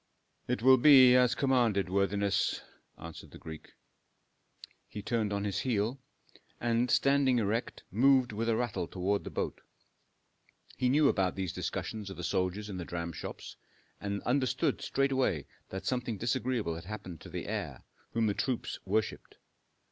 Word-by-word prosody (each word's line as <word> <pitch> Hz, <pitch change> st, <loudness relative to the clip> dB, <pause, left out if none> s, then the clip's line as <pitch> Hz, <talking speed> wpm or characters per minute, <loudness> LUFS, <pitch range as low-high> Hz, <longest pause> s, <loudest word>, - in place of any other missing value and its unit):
"It 125 Hz, -2 st, -1 dB
will 130 Hz, 0 st, +8 dB
be 130 Hz, -2 st, +8 dB
as 125 Hz, 0 st, +4 dB
commanded, 120 Hz, -8 st, +2 dB
worthiness," 100 Hz, +1 st, 0 dB, 0.3 s
answered 85 Hz, -1 st, -10 dB
the -, -, -12 dB
Greek. 80 Hz, -1 st, -10 dB, 1.1 s
He 105 Hz, -, -8 dB
turned 110 Hz, -2 st, 0 dB
on 100 Hz, 0 st, -1 dB
his 100 Hz, -2 st, -1 dB
heel, 120 Hz, +1 st, -1 dB, 0.6 s
and 120 Hz, +1 st, +1 dB
standing 135 Hz, -1 st, +3 dB
erect 115 Hz, +1 st, -1 dB
moved 130 Hz, +4 st, +4 dB
with 115 Hz, +2 st, -2 dB
a 115 Hz, -, +3 dB
rattle 105 Hz, -8 st, -2 dB
toward 100 Hz, +3 st, -1 dB
the -, -, -6 dB
boat. -, -, -3 dB, 1.1 s
He 125 Hz, -, +1 dB
knew 145 Hz, +2 st, +4 dB
about 95 Hz, -7 st, +1 dB
these 95 Hz, -3 st, -3 dB
discussions 105 Hz, -3 st, -4 dB
of 95 Hz, -, -8 dB
the 90 Hz, -, -6 dB
soldiers 95 Hz, +4 st, -1 dB
in 100 Hz, -3 st, -6 dB
the 90 Hz, -, -4 dB
dramshops, 85 Hz, -1 st, -6 dB, 0.4 s
and 100 Hz, 0 st, -4 dB
understood 130 Hz, 0 st, 0 dB
straightway 130 Hz, -, 0 dB, 0.2 s
that 95 Hz, -, -6 dB
something 125 Hz, -4 st, -1 dB
disagreeable 115 Hz, -3 st, -1 dB
had 80 Hz, +1 st, -8 dB
happened 95 Hz, -5 st, -7 dB
to -, -, -10 dB
the -, -, -5 dB
heir, -, -, -4 dB, 0.3 s
whom 115 Hz, -1 st, +1 dB
the 105 Hz, -, +2 dB
troops 125 Hz, +3 st, -2 dB
worshipped. 105 Hz, +3 st, -2 dB
110 Hz, 150 wpm, -31 LUFS, 95-125 Hz, 1.1 s, will